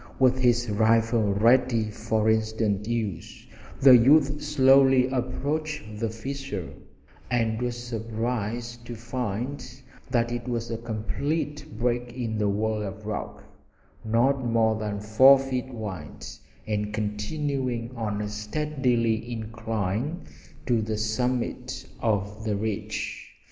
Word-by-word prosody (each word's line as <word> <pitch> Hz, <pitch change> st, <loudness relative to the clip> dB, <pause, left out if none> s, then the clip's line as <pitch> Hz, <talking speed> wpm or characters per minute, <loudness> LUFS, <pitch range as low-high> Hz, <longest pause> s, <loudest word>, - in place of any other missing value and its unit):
With 130 Hz, -1 st, +4 dB
his 120 Hz, -1 st, +3 dB
rifle 110 Hz, 0 st, +3 dB
ready 115 Hz, 0 st, +3 dB
for 110 Hz, 0 st, -1 dB
instant 110 Hz, -2 st, +1 dB
use 110 Hz, -7 st, -4 dB, 0.4 s
the 130 Hz, -2 st, +9 dB
youth 140 Hz, +4 st, +5 dB
slowly 135 Hz, -3 st, +5 dB
approached 135 Hz, -1 st, -3 dB
the 115 Hz, 0 st, 0 dB
fissure, 130 Hz, -3 st, -5 dB, 0.6 s
and 115 Hz, -2 st, 0 dB
was 120 Hz, -1 st, -2 dB
surprised 115 Hz, 0 st, -3 dB
to 120 Hz, -, -5 dB
find 120 Hz, +3 st, -4 dB, 0.5 s
that 120 Hz, -2 st, +1 dB
it 120 Hz, 0 st, -4 dB
was 115 Hz, -1 st, -2 dB
a 115 Hz, -, -2 dB
complete 130 Hz, +5 st, -3 dB
break 120 Hz, 0 st, -1 dB
in 115 Hz, -3 st, -3 dB
the 105 Hz, -1 st, +2 dB
wall 110 Hz, +1 st, 0 dB
of 105 Hz, +1 st, -6 dB
rock, 105 Hz, 0 st, -5 dB, 0.6 s
not 125 Hz, +5 st, +2 dB
more 115 Hz, -2 st, +2 dB
than 105 Hz, -1 st, -3 dB
four 120 Hz, +7 st, +7 dB
feet 130 Hz, -1 st, -3 dB
wide, 100 Hz, -, -7 dB, 0.4 s
and 105 Hz, 0 st, -2 dB
continuing 120 Hz, +3 st, -2 dB
on 105 Hz, -3 st, -2 dB
a -, -, -3 dB
steady 115 Hz, 0 st, -1 dB
incline 110 Hz, -, -3 dB, 0.4 s
to 120 Hz, -3 st, +2 dB
the 110 Hz, 0 st, -2 dB
summit 125 Hz, +3 st, -2 dB
of 105 Hz, -1 st, -1 dB
the 110 Hz, -2 st, 0 dB
ridge. 105 Hz, 0 st, -4 dB
115 Hz, 120 wpm, -26 LUFS, 110-125 Hz, 0.6 s, the